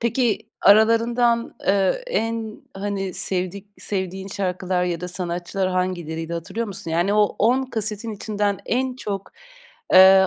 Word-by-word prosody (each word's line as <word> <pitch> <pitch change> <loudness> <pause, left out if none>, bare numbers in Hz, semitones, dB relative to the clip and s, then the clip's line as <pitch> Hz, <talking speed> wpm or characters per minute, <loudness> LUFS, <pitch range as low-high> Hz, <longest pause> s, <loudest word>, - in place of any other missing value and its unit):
peki, 235 -1 +1 0.2
aralarından, 230 +3 +4
eee, 195 - +2
en, 225 - -2
hani, 195 -2 -3
sevdik 190 +1 -3
sevdiğin 190 0 -3
şarkılar 185 -2 -1
ya 175 -2 -2
da 180 - -4
sanatçılar 180 +1 -2
hangileriydi, 170 -3 -2
hatırlıyor 175 +8 -3
musun? 190 -5 -6
Yani, 175 +5 +2
o 210 0 +6
10 245 +5 +3
kasetin 220 0 -2
içinden 205 -1 -1
en 255 +1 0
çok, 200 -6 -5 0.6
eee, 190 +1 +9
195 Hz, 130 wpm, -23 LUFS, 185-220 Hz, 0.6 s, eee